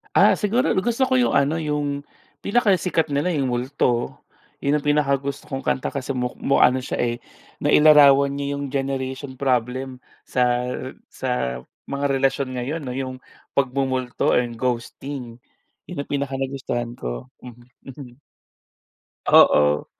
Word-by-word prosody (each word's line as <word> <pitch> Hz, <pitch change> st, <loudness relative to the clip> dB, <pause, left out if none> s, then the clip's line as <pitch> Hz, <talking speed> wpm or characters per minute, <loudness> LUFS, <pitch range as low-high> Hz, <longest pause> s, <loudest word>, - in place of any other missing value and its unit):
Ah, -, -, +6 dB
siguro, 230 Hz, +5 st, 0 dB, 0.2 s
gusto 240 Hz, +3 st, +1 dB
ko 260 Hz, -, 0 dB
'yong 250 Hz, -1 st, +3 dB
ano, 140 Hz, +3 st, +2 dB
'yong 145 Hz, -3 st, -2 dB, 0.4 s
pinakasikat 190 Hz, -7 st, +2 dB
nila, 155 Hz, +6 st, +1 dB
'yong 140 Hz, -5 st, 0 dB
Multo. 125 Hz, -1 st, -1 dB, 0.4 s
'Yon 140 Hz, +1 st, 0 dB
ang 150 Hz, -, 0 dB
pinakagusto 140 Hz, -1 st, 0 dB
kong 135 Hz, -2 st, -5 dB
kanta 130 Hz, -, -1 dB
kasi 140 Hz, -1 st, -4 dB
muk 125 Hz, -2 st, -2 dB
mu 140 Hz, -, +1 dB
ano 130 Hz, +1 st, +4 dB
siya, -, -, -4 dB
eh, 120 Hz, 0 st, -1 dB, 0.4 s
nailarawan 140 Hz, -2 st, +6 dB
niya 140 Hz, 0 st, -3 dB
'yong 140 Hz, -1 st, -6 dB
generation 135 Hz, 0 st, -3 dB
problem 130 Hz, 0 st, -1 dB, 0.2 s
sa 125 Hz, 0 st, +1 dB, 0.4 s
sa 60 Hz, 0 st, -3 dB, 0.2 s
mga 140 Hz, 0 st, -2 dB
relasyon 135 Hz, 0 st, +1 dB
ngayon 145 Hz, +7 st, -3 dB
'no, 130 Hz, -, -5 dB
'yong 130 Hz, 0 st, -5 dB, 0.3 s
pagmumulto 130 Hz, -2 st, 0 dB
or 125 Hz, -, +4 dB, 0.2 s
ghosting. 125 Hz, 0 st, -4 dB, 0.5 s
'Yon 170 Hz, -6 st, -5 dB
ang -, -, -16 dB
pinakanagustuhan 135 Hz, -3 st, -3 dB
ko. -, -, -6 dB
Mhm, 120 Hz, -1 st, -13 dB, 0.3 s
mhm. 130 Hz, -1 st, -12 dB, 1.1 s
Oo. 75 Hz, 0 st, +5 dB
135 Hz, 130 wpm, -22 LUFS, 125-145 Hz, 1.1 s, Ah